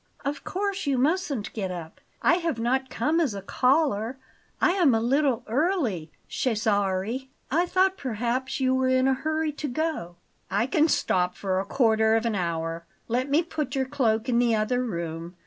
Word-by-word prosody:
"Of 280 +1 -3
course 390 -3 -2
you 275 -2 +2
mustn't 280 - 0
get 195 -4 -3
up; 170 -3 -8 0.2
I 350 - +5
have 335 -7 -2
not 260 +3 0
come 300 +7 0
as 280 -11 +1
a 195 - -5
caller. 255 -1 +1 0.4
I - - +4
am 345 -10 +4
a - - +2
little 260 +1 +1
early, 245 - 0 0.2
Cesare. 215 +1 0 0.2
I 340 +5 +3
thought 375 +1 +2
perhaps 255 +1 -2
you 260 -1 +2
were 260 0 +2
in 260 0 +3
a 265 - +4
hurry 310 +3 -1
to 295 0 -5
go." 285 - -2 0.3
"I 200 +4 +1
can 300 +4 +3
stop 180 - +1
for 190 -2 -1
a 195 - -2
quarter 220 -3 +3
of 225 +1 +1
an 230 - +1
hour. 165 -3 -2 0.2
Let 250 +4 -1
me 300 +5 +3
put 310 -4 -4
your 265 -1 +1
cloak 235 -4 0
in 240 -2 +2
the 235 -2 +3
other 245 +4 0
room. 170 -4 -5
250 Hz, 180 wpm, -26 LUFS, 215-290 Hz, 0.4 s, I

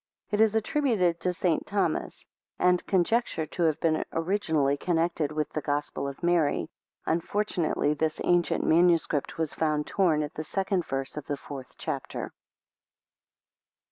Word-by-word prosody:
It 210 +1 +2
is 220 -1 +4
attributed 220 - +1
to 180 - 0
St. 175 -2 0
Thomas, 200 -1 -2 0.3
and 180 0 +3
conjectured 190 -3 +1
to 175 - 0
have 160 -1 +1
been 155 -1 +1
originally 160 -5 +1
connected 165 -1 0
with 155 -1 -2
the, 155 - -1
Gospel 145 0 -2
of 140 +3 -8
Mary. 170 -4 +2 0.3
Unfortunately 170 -3 0
this 155 +1 -1
ancient 175 -1 +2
MS. 170 0 +4 0.3
was 160 -2 -1
found 150 -2 0
torn 165 -6 +2
at 150 - -6
the 155 - -4
second 190 +1 -1
verse 135 +2 -4
of 150 - -6
the 145 - -2
fourth 135 -3 -9
chapter. - - -4
165 Hz, 140 wpm, -28 LUFS, 150-180 Hz, 0.3 s, is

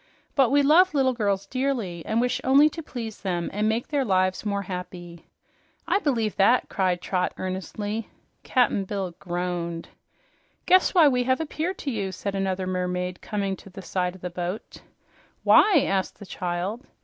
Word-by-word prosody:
But 270 -4 +4
we 285 +1 +4
love 325 +4 +5
little 265 -2 +3
girls 200 -4 0
dearly 235 -8 -2
and 220 - +1
wish 245 +1 0
only 280 +4 +6
to 330 - -6
please 230 -7 -7
them 175 -3 -2
and 210 +2 +1
make 225 +2 -1
their 285 -2 +1
lives 185 -4 +1
more 200 -1 -1
happy." 180 -2 -8 0.6
"I - - +3
believe 230 - 0
that!" 230 +6 +4
cried 185 -3 0
Trot 180 -1 -1
earnestly. 205 +4 -4 0.3
Cap'n 235 -6 +1
Bill 190 -2 -3
groaned. 175 -2 -3 0.8
"Guess 370 +1 +4
why 330 -4 +7
we 250 -3 +2
have 260 +1 +2
appeared 325 +4 -3
to 280 - -3
you," 200 -5 -2
said 200 +2 -4
another 190 -1 -1
mermaid, 180 0 -2
coming 200 -2 -2
to 195 - -14
the 195 +1 -10
side 180 0 -2
of 190 - -15
the 180 - -5
boat. 180 +4 -5 0.6
"Why?" 375 -10 +6
asked 190 -1 -1
the 200 - -10
child. 185 +6 -3
200 Hz, 170 wpm, -25 LUFS, 180-255 Hz, 0.8 s, why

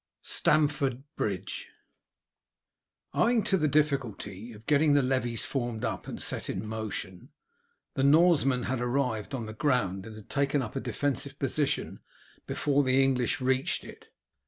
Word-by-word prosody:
STAMFORD 145 -4 +2
BRIDGE. 100 -4 -3 1.5
Owing 230 -1 +3
to 195 - +2
the 155 -5 +2
difficulty 125 -8 -1
of 110 0 -13
getting 150 0 +4
the 140 - +4
levies 125 -3 0
formed 120 -5 -2
up - - -4
and - - -6
set - - -1
in 95 - -3
motion, 110 -4 -5 0.6
the - - -1
Norsemen 140 -4 +5
had 130 0 -2
arrived 125 -2 -1
on 120 -4 -4
the 110 - -7
ground 110 -7 0
and 110 - -9
had 110 -2 -12
taken 140 -1 +1
up 110 - -7
a - - 0
defensive 140 -1 -2
position - - -1 0.5
before 145 -1 +1
the 130 -1 +3
English 130 -3 +1
reached 130 +1 +1
it. - - -13
130 Hz, 145 wpm, -29 LUFS, 110-145 Hz, 1.5 s, Norsemen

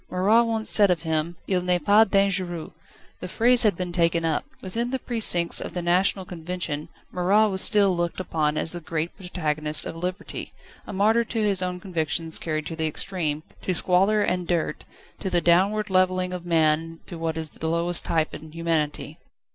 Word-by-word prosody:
Marat 210 +6 +3
once 225 -1 -1
said 205 -2 +7
of 175 -2 0
him: 160 +1 -1
"Il 185 -2 0
n'est 180 0 +2
pas 215 +2 +6
dangereux." 190 -4 0 0.5
The - - -6
phrase 240 +6 +3
had 210 -5 +3
been 180 0 -4
taken 170 -1 +1
up. 160 -2 -1
Within 230 +6 -3
the 265 - -1
precincts 215 -9 +2
of - - -7
the 175 - -3
National 185 +2 +1
Convention, 170 -3 -4 0.2
Marat 200 +4 +3
was 190 0 0
still 205 -6 +4
looked 170 +1 -2
upon 155 -4 -1
as 160 - -1
the 175 - -6
great 160 +1 -4
protagonist 155 -5 -2
of - - -6
Liberty, 180 +4 -5 0.3
a - - -6
martyr 215 +4 +2
to 225 -1 -2
his 200 -3 +2
own 180 0 -3
convictions 165 -3 -1
carried 155 -2 -3
to 165 - -5
the 160 -1 -1
extreme, 155 -2 -2 0.2
to 185 - -2
squalor 195 +5 +3
and 180 -2 -1
dirt, 170 -3 -2 0.3
to 190 - -3
the 175 -1 +2
downward 195 +5 +2
levelling 185 0 +1
of 175 -1 -7
man 165 0 +1
to 170 - -8
what 165 -1 -2
is 160 -1 -3
the 160 - -5
lowest 170 +1 0
type 160 -1 -1
in 155 0 -10
humanity. 165 -3 -2
180 Hz, 185 wpm, -24 LUFS, 165-195 Hz, 0.5 s, said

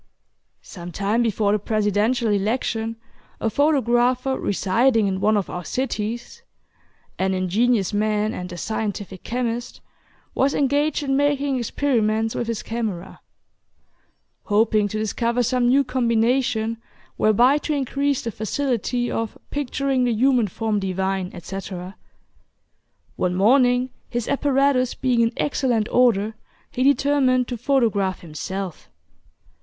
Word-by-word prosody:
Some 175 -2 -9
time 205 +6 0
before 215 -3 +1
the 210 - +2
Presidential 215 +3 +1
election, 225 +2 -1 0.4
a 225 - -1
photographer 255 -2 +2
residing 225 +4 +2
in 190 -1 -1
one 215 +1 +3
of 200 - -1
our 180 - -5
cities 240 - -4 0.8
(an 190 0 +1
ingenious 200 +3 +1
man 215 +1 0
and 180 0 -6
a 175 - -7
scientific 205 -2 -4
chemist,) 240 0 -3 0.5
was 275 +1 +1
engaged 290 +2 +1
in 270 -1 0
making 285 -1 +1
experiments 225 -3 0
with 235 - -3
his 230 -2 -3
camera, 220 -7 -4 1.2
hoping 210 0 +2
to 215 - -4
discover 235 +3 0
some 245 +1 +1
new 275 +3 +4
combination 235 -2 +1 0.4
whereby 240 +7 +4
to 305 - -4
increase 280 0 -1
the 230 - -3
facility 240 +2 -1
of 225 -1 -3
"picturing 275 -2 0
the 245 - +1
human 245 0 +3
form 215 +2 -1
divine," 190 -1 -2
etc. 185 +1 -7 1.2
One 180 -1 0
morning, 245 +4 +3 0.2
his 240 -2 -3
apparatus 275 -2 +2
being 245 -2 +1
in 230 0 +2
excellent 245 -6 0
order, 225 -4 +3 0.4
he 250 - -4
determined 270 -2 +3
to 245 - -2
photograph 220 -7 +1
himself. 180 +2 -6
230 Hz, 120 wpm, -22 LUFS, 205-255 Hz, 1.2 s, new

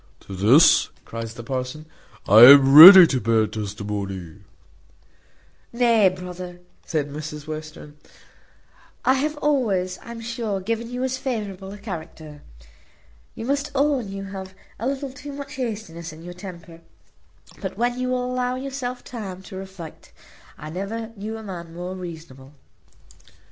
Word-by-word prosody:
"To 95 - -10
this," 115 - +5 0.2
cries 115 0 -7
the 120 - -9
parson, 130 +5 -5 0.4
"I 105 +3 +7
am 135 0 +8
ready 180 +5 +12
to 130 -6 -1
bear 110 0 +2
testimony." 100 -4 -6 1.3
"Nay, 235 -4 +3
brother," 180 -1 -9 0.2
says 155 -4 -2
Mrs 150 +1 -8
Western, 155 -1 -9 1.1
"I 260 - +5
have 295 +3 -2
always, 215 -12 -1
I'm 235 0 -9
sure, 230 -3 -4
given 230 +4 -4
you 250 +1 -4
as 260 0 -2
favourable 205 -7 -5
a 205 - -9
character. 160 -7 -9 0.9
You 225 - -7
must 280 +2 -1
own 275 -5 +1
you 195 0 -6
have 190 -1 -9 0.2
a 230 - -3
little 275 0 -3
too 285 +2 -9
much 280 0 -8
hastiness 205 -9 -5
in 160 +1 -13
your 175 +1 -9
temper; 170 -3 -11 0.8
but - - -6
when 245 +1 -1
you 255 - -2
will 250 -1 -1
allow 250 0 -2
yourself 255 -2 -5
time 195 -6 -8
to 190 - -11
reflect 190 -4 -10 0.4
I 155 +1 -9
never 220 +6 -5
knew 215 +2 -6
a 220 - -10
man 170 -4 -9
more 180 +1 -6
reasonable." 160 -7 -10
190 Hz, 145 wpm, -22 LUFS, 155-235 Hz, 1.3 s, ready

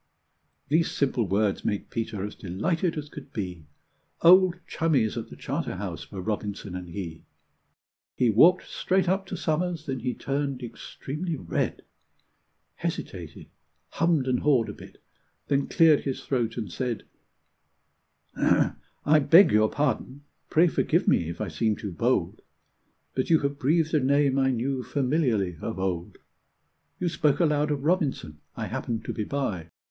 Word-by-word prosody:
These 160 +4 +2
simple 130 -6 0
words 100 +2 +1
made 105 - -2
Peter 115 -4 -3
as 105 - -6
delighted 160 - -2
as 150 -1 -4
could - - -11
be; 90 -7 -5 0.6
Old 180 +1 +7
chummies 135 -10 +1
at 115 -2 -5
the - - -10
Charterhouse 90 -2 -4
were 95 -2 -6
Robinson 105 -2 -4
and 90 -1 -6
he. 85 -3 -6 0.9
He 120 -3 +3
walked 170 - +5
straight 190 -1 0
up 190 +2 0
to 185 - -5
Somers, 165 0 -1
then 130 -2 -3
he 125 +1 -2
turned 140 -2 -2
extremely 150 +7 -5
red, 85 - -2 0.9
Hesitated, - - -5 0.4
hummed 165 -5 +1
and 125 -1 +1
hawed 130 -7 +2
a - - -5
bit, - - -14 0.5
then 140 -1 +1
cleared 160 -4 +5
his 135 -2 -4
throat, 120 -4 -1
and 110 -6 -4
said: 120 +3 -3 1.3
"I 155 +1 +1
beg 165 +7 +7
your 110 0 +4
pardon 145 0 -2 0.3
pray 165 +3 +5
forgive - - +1
me 85 - +3
if 85 - -6
I - - -2
seem 110 -2 0
too 100 -2 -6
bold, 85 - 0 0.7
But 130 - -1
you 160 -2 +5
have 140 0 -2
breathed 155 +3 +2
a 155 - +4
name 140 0 +2
I 135 0 +3
knew 130 +2 -1
familiarly 125 - 0
of 110 - -4
old. 90 -3 -3 0.8
You 180 - 0
spoke 150 -3 +1
aloud 150 -3 +2
of 145 -2 -2
Robinson 145 - 0 0.2
I - - -3
happened 115 -2 -4
to - - -3
be 105 - -3
by. 100 - -3
130 Hz, 150 wpm, -26 LUFS, 105-155 Hz, 1.3 s, Old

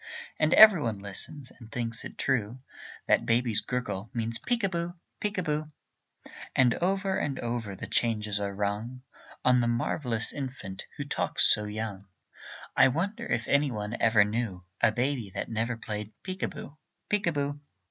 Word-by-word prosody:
And 155 +1 +4
every 215 -7 +10
one 115 -6 -1
listens, 105 - -2
and 115 -2 -14
thinks 115 -1 -1
it - - -9
true 125 -2 0 0.5
That - - +4
baby's 115 -2 +2
gurgle 115 -4 -3
means 115 0 -1
"Peek 240 -2 -1
a 195 - +3
boo, 170 0 -3 0.2
peek 210 0 -2
a 185 - +1
boo"; 150 -1 -1 0.9
And 125 -2 +5
over 190 +2 0
and 140 -2 -2
over 115 -4 -3
the - - -6
changes 105 -3 0
are 100 -1 -2
rung 105 +5 -3 0.4
On 125 0 +6
the 120 - +1
marvellous 120 0 0
infant 130 -9 -6
who - - -2
talks - - +2
so 105 - -1
young. 105 -2 -5 0.7
I 135 - +7
wonder 175 - -2
if 120 -1 -1
any 140 0 +3
one 105 -1 -4
ever 110 -2 +5
knew 105 -4 -2 0.2
A - - +5
baby 125 -2 -1
that - - -3
never 115 +1 -1
played 105 -1 -5
peek 185 0 -5
a - - +1
boo, 150 +2 -10 0.3
peek 205 -3 0
a - - +4
boo. 145 -1 -2
120 Hz, 175 wpm, -29 LUFS, 110-145 Hz, 0.9 s, every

